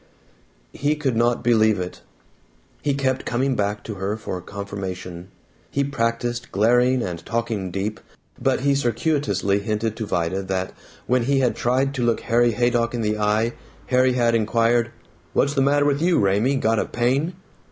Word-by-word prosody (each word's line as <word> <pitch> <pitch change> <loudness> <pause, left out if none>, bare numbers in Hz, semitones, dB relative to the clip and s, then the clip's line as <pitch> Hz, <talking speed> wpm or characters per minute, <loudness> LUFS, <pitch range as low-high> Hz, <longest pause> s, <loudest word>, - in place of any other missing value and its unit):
He 145 +2 0
could 140 -5 -1
not 120 +1 +1
believe 110 -3 +3
it. 90 0 -6 0.8
He 145 -2 0
kept 130 -1 0
coming 130 +3 0
back 105 0 -1
to 110 - -5
her 100 +3 -1
for 95 -4 -5
confirmation. 95 -2 -6 0.4
He 140 - 0
practised 120 -2 -2
glaring 125 +4 +3
and 85 -3 -5
talking 115 -5 -2
deep, 100 +4 -3 0.4
but 130 0 +1
he 140 +1 +3
circuitously 120 - 0
hinted 105 +2 -2
to 110 - -4
Vida 90 0 -1
that 95 -1 -3 0.3
when 125 -1 +1
he 135 +1 +2
had 125 - +1
tried 130 +3 +1
to 130 -3 -2
look 120 -1 +1
Harry 120 0 +2
Haydock 120 +1 +1
in 120 - -2
the 105 -1 -1
eye, 110 +3 +1 0.3
Harry 130 0 +3
had 120 -2 +2
inquired, 115 +1 +2 0.4
"What's 140 - +2
the 140 - +1
matter 145 +1 +3
with 145 0 +1
you, 175 +1 +3
Raymie? 105 +7 +2
Got 115 -4 +1
a - - 0
pain?" 135 +8 0
115 Hz, 165 wpm, -23 LUFS, 105-130 Hz, 0.8 s, believe